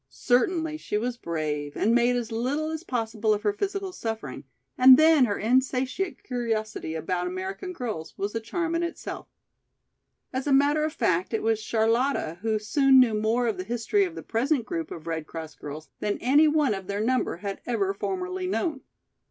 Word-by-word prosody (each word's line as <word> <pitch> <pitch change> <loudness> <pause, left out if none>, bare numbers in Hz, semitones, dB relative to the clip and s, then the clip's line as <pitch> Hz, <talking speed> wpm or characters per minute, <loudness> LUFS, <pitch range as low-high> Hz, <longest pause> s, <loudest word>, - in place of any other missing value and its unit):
Certainly 310 +6 +1
she 210 - -3
was 240 +3 -2
brave 155 -7 -3
and 225 - +2
made 240 +1 +3
as 240 -2 -3
little 275 +8 -1
as 320 +1 -5
possible 225 -6 0
of 205 - -7
her 205 -1 +2
physical 395 - -3
suffering, 225 -7 -5 0.3
and 255 0 +9
then 310 -3 +6
her 205 -3 -1
insatiate 260 - 0
curiosity 220 -8 -3
about 175 +3 -2
American 190 - -5
girls 225 - -5
was 200 +1 -3
a 225 - -1
charm 330 +9 -2
in 335 - +1
itself. 340 0 -5 1.1
As 260 +2 -2
a - - +1
matter 285 +3 +4
of 310 - 0
fact 185 - 0
it - - -2
was 220 -1 +1
Charlotta 225 - 0
who 220 0 +1
soon 265 +5 +4
knew 245 -4 +5
more 220 +3 +1
of 220 -5 -1
the 185 - -3
history 240 - +1
of 355 -3 -3
the - - -7
present 250 +2 0
group 330 +3 -4
of 160 - -8
Red 160 -2 -3
Cross 160 -1 -8
girls 150 +2 -8
than 210 -1 -1
any 290 +5 +4
one 300 -6 +2
of 195 -2 -6
their 200 +1 -2
number 250 -6 0
had 200 -1 -4
ever 200 -5 0
formerly 370 - -3
known. 325 -6 -1
235 Hz, 185 wpm, -26 LUFS, 205-290 Hz, 1.1 s, and